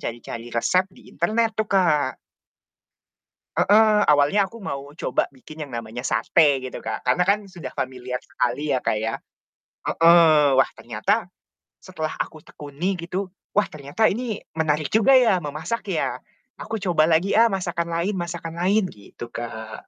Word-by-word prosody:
cari-cari 115 Hz, 0 st, -6 dB
resep 185 Hz, +10 st, +2 dB
di -, -, -18 dB
internet 220 Hz, +6 st, +1 dB
tuh 220 Hz, -2 st, 0 dB
Kak. 155 Hz, -8 st, +2 dB, 1.4 s
Heeh, 215 Hz, 0 st, +5 dB
awalnya 150 Hz, +8 st, +3 dB
aku 230 Hz, -, -12 dB
mau 140 Hz, -7 st, -6 dB
coba -, -, 0 dB
bikin 155 Hz, +4 st, -10 dB
yang 140 Hz, -, -11 dB
namanya 115 Hz, +1 st, -6 dB
sate 135 Hz, +5 st, +3 dB
gitu 130 Hz, 0 st, -7 dB
Kak, 110 Hz, -1 st, -5 dB
karena 125 Hz, +8 st, +3 dB
kan 200 Hz, +3 st, +3 dB
sudah 170 Hz, -9 st, -8 dB
familiar 125 Hz, -1 st, -4 dB
sekali 140 Hz, +5 st, -2 dB
ya -, -, +1 dB
Kak, 110 Hz, -, +1 dB
ya, 110 Hz, +1 st, -2 dB, 0.8 s
heeh, 165 Hz, -3 st, +6 dB
wah 135 Hz, -, +4 dB
ternyata, -, -, -1 dB, 0.5 s
setelah 155 Hz, 0 st, -5 dB
aku 155 Hz, -1 st, -5 dB
tekuni 150 Hz, +7 st, -4 dB
gitu, 180 Hz, +3 st, -4 dB, 0.2 s
wah 210 Hz, 0 st, +4 dB
ternyata 150 Hz, +9 st, 0 dB
ini 225 Hz, -1 st, -3 dB, 0.2 s
menarik 155 Hz, -2 st, 0 dB
juga 225 Hz, +5 st, +5 dB
ya, 225 Hz, -7 st, +5 dB
memasak 155 Hz, +10 st, -4 dB
ya, -, -, -1 dB, 0.4 s
aku 225 Hz, -, -5 dB
coba 170 Hz, -5 st, +3 dB
lagi 170 Hz, +4 st, +2 dB
ah 230 Hz, +1 st, +7 dB
masakan 180 Hz, -5 st, -2 dB
lain 180 Hz, +5 st, 0 dB
masakan 170 Hz, -1 st, -5 dB
lain, 200 Hz, +4 st, +3 dB
gitu 110 Hz, +3 st, -11 dB
Kak. 110 Hz, -2 st, -7 dB
160 Hz, 150 wpm, -23 LUFS, 135-195 Hz, 1.4 s, ah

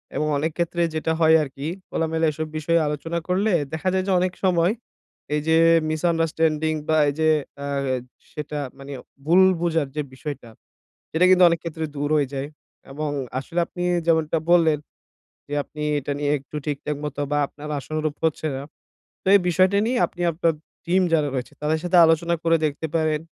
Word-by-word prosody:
এবং 150 Hz, -, 0 dB
অনেক 155 Hz, +3 st, -1 dB
ক্ষেত্রে 170 Hz, 0 st, -1 dB
যেটা 160 Hz, +1 st, -1 dB
হয় 160 Hz, -1 st, +6 dB
আরকি 140 Hz, +1 st, -6 dB, 0.2 s
খোলামেলা 160 Hz, 0 st, 0 dB
এসব 155 Hz, +1 st, -4 dB
বিষয়ে 165 Hz, +2 st, +2 dB
আলোচনা 165 Hz, +3 st, -3 dB
করলে 195 Hz, +4 st, +1 dB, 0.2 s
দেখা 160 Hz, +4 st, -1 dB
যায় 190 Hz, 0 st, +1 dB
যে -, -, +1 dB
অনেক 180 Hz, 0 st, 0 dB
সময় 175 Hz, -1 st, +3 dB, 0.6 s
এই 150 Hz, -, +1 dB
যে 160 Hz, 0 st, +4 dB, 0.3 s
মিসআন্ডারস্ট্যান্ডিং 160 Hz, -1 st, +1 dB
বা 160 Hz, 0 st, +3 dB
এই -, -, -2 dB
যে 160 Hz, -, +3 dB, 0.4 s
আ -, -, -4 dB, 0.7 s
সেটা 150 Hz, 0 st, -5 dB, 0.2 s
মানি 140 Hz, +1 st, -9 dB, 0.3 s
ভুল 175 Hz, +4 st, +5 dB, 0.2 s
বোঝার 165 Hz, -4 st, +1 dB
যে 150 Hz, -, 0 dB
বিষয়টা, 140 Hz, -3 st, -7 dB, 0.6 s
সেটা 165 Hz, +3 st, +3 dB
কিন্তু 185 Hz, 0 st, +6 dB
অনেক 170 Hz, 0 st, 0 dB
ক্ষেত্রে 160 Hz, -1 st, -4 dB
দূর 145 Hz, +1 st, -2 dB
হয়ে 145 Hz, -2 st, +1 dB
যায়। 135 Hz, +1 st, -3 dB, 0.4 s
এবং 150 Hz, +2 st, -3 dB, 0.3 s
আসলে 165 Hz, +6 st, -3 dB
আপনি 175 Hz, -, -6 dB, 0.2 s
যেমনটা 160 Hz, -1 st, +2 dB
বললেন 165 Hz, -3 st, +5 dB, 0.7 s
যে 145 Hz, -, -3 dB
আপনি 150 Hz, -, -8 dB, 0.2 s
এটা 145 Hz, -, -3 dB
নিয়ে 145 Hz, 0 st, +1 dB
একটু 140 Hz, +2 st, -10 dB
ঠিকঠাক 150 Hz, 0 st, -3 dB
মতো 145 Hz, -1 st, -4 dB
বা 145 Hz, -, +2 dB
আপনার 150 Hz, +1 st, -10 dB
আশানুরূপ 155 Hz, +2 st, -3 dB
হচ্ছে 160 Hz, 0 st, 0 dB
না। 135 Hz, -, -5 dB, 0.6 s
তো -, -, -7 dB
এই -, -, +7 dB
বিষয়টা 185 Hz, +3 st, +3 dB
নিয়ে 250 Hz, +1 st, 0 dB
আপনি 175 Hz, -, -9 dB
আপনার 165 Hz, 0 st, +1 dB, 0.3 s
টিম 185 Hz, +2 st, +3 dB
যারা 155 Hz, -3 st, +3 dB
রয়েছে 125 Hz, -2 st, -4 dB
তাদের 155 Hz, +1 st, 0 dB
সাথে 180 Hz, 0 st, +2 dB
আলোচনা 165 Hz, +1 st, +2 dB
করে 165 Hz, 0 st, +4 dB
দেখতে 150 Hz, +2 st, -2 dB
পারেন 155 Hz, -2 st, +1 dB
160 Hz, 175 wpm, -23 LUFS, 150-170 Hz, 0.7 s, এই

